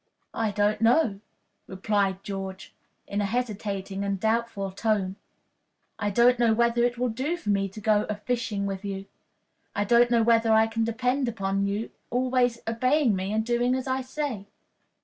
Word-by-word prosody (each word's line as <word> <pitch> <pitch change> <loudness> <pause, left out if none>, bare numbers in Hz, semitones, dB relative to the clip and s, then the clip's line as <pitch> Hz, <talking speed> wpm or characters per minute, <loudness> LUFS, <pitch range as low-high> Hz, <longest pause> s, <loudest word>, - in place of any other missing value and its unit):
"I 225 -1 0
don't 210 +1 +1
know," 225 -3 +3 0.5
replied 195 0 -1
George, 195 -1 -6 0.3
in 200 +1 -2
a - - 0
hesitating 200 -3 -3
and 200 -1 -2
doubtful 220 -2 -1
tone. 195 -2 0 0.8
"I 205 -1 0
don't 240 +4 +4
know 230 -2 +4
whether 235 +1 +2
it 240 0 +1
will 250 0 0
do 265 +10 -2
for 210 -11 -2
me 195 -1 +1
to 195 - -10
go 210 -1 +2
a 210 - -1
fishing 215 -2 -2
with 195 0 -4
you. 195 -1 -5 0.7
I 205 - +1
don't 240 +3 +4
know 235 -1 +3
whether 230 0 +3
I 220 0 +5
can 225 0 -1
depend 250 +4 0
upon 195 -2 -1
your 205 +3 -2 0.2
always 250 -1 +1
obeying 255 +1 +2
me 190 +1 -3
and 220 +1 0
doing 240 +1 +1
as 260 - -3
I 260 0 -1
say." 260 -6 -4
220 Hz, 170 wpm, -26 LUFS, 200-240 Hz, 0.8 s, I